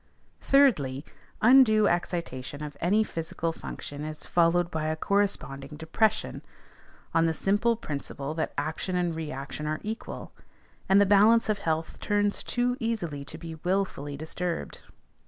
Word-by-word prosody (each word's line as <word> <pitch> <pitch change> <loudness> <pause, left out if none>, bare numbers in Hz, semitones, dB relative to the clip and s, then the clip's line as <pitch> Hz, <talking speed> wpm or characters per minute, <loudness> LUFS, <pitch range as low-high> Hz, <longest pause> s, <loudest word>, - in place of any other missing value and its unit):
Thirdly, 155 - +3 0.4
undue 225 -3 +7
excitation 150 -5 -2
of 150 -1 -6
any 205 +6 +3
physical 165 -3 -3
function 145 -2 -7
is 155 0 -5
followed 175 0 +2
by 160 -1 -2
a 155 - 0
corresponding 155 -7 -1
depression, 160 +8 0 0.7
on 165 0 +4
the 160 - 0
simple 205 +7 +2
principle 145 -6 -5
that 160 0 -2
action 160 +5 -2
and 175 -2 0
reaction 150 -1 -5
are 155 0 -1
equal; 220 +2 -6 0.6
and 195 +1 +6
the 205 - +6
balance 210 +3 +5
of 210 -2 +1
health 160 -2 -2
turns 205 -1 +1
too 245 +1 0
easily 180 - -2
to 160 - -7
be 165 0 -7
wilfully 180 -7 -1
disturbed. 165 +3 -4
170 Hz, 135 wpm, -28 LUFS, 155-205 Hz, 0.7 s, undue